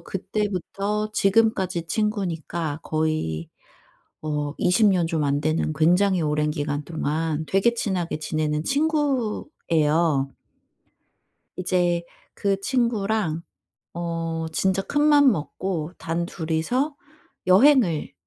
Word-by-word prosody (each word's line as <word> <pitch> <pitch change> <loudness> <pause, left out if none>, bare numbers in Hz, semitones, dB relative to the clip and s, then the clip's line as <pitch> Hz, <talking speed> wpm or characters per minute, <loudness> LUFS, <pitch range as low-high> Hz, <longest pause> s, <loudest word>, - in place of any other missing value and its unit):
그때부터 205 +2 -3
지금까지 190 -4 +2
친구니까 175 -7 -2
거의 155 - -1 0.7
어 150 -1 -2
20 210 +4 +4
년 180 -4 +2
좀 160 -2 0
안 140 0 +1
되는 155 +1 0
굉장히 180 +5 +3
오랜 150 0 +1
기간 145 -1 -3
동안 160 0 -2
되게 195 +5 +3
친하게 185 -8 -2
지내는 155 0 -1
친구예요. 210 - +1 1.3
이제 175 -2 +1 0.3
그 195 -1 0
친구랑 220 - 0 0.5
어 165 -1 -3
진짜 190 +3 +1
큰맘 290 +2 +4
먹고 170 0 -3
단둘이서 170 - -2 0.5
여행을 190 - +4
175 Hz, 200 characters per minute, -24 LUFS, 155-210 Hz, 1.3 s, 20